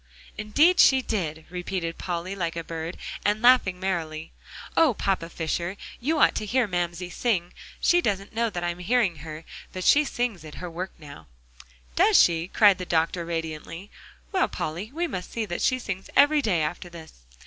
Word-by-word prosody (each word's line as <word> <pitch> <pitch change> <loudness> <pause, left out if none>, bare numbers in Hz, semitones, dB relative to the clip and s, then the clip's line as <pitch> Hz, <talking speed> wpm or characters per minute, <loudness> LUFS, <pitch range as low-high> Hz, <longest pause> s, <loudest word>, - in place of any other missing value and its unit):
"Indeed 295 +13 +3
she 265 -1 +6
did!" 160 -9 -3
repeated 180 -2 -4
Polly 180 +2 -4
like 170 -3 -3
a 165 - -4
bird, 165 +1 -6 0.3
and 210 +1 +1
laughing 235 -7 +4
merrily. 165 -4 -3 0.4
"Oh, 305 -8 +4
Papa 185 -5 -1
Fisher! 170 +3 -3 0.2
you 310 +6 0
ought - - +5
to 215 - -3
hear 245 +2 +2
Mamsie 175 -1 -3
sing. 180 -7 -1 0.3
She 350 0 +4
doesn't 200 - -2
know 230 +1 +1
I'm 175 0 -2
hearing 195 -3 +1
her, 155 +2 -9 0.3
but 185 - -5
she 295 +9 +5
sings 240 - -3
at 155 -1 -10
her 180 -1 -7
work 180 +3 -5
now." 145 - -12 0.7
"Does - - +5
she?" 165 0 +3
cried 205 -1 +4
the - - -3
doctor 170 0 0
radiantly. 165 +3 -5 0.4
"Well, 375 -2 +2
Polly, 175 +8 -5
we 335 +5 -2
must 185 - -5
see 230 -2 -2
that 175 -4 -4
she 255 - +2
sings 195 -6 -6
every 290 +1 +5
day, 180 - +1
after 175 +3 -4
this." 160 - -13
180 Hz, 175 wpm, -25 LUFS, 165-220 Hz, 0.7 s, she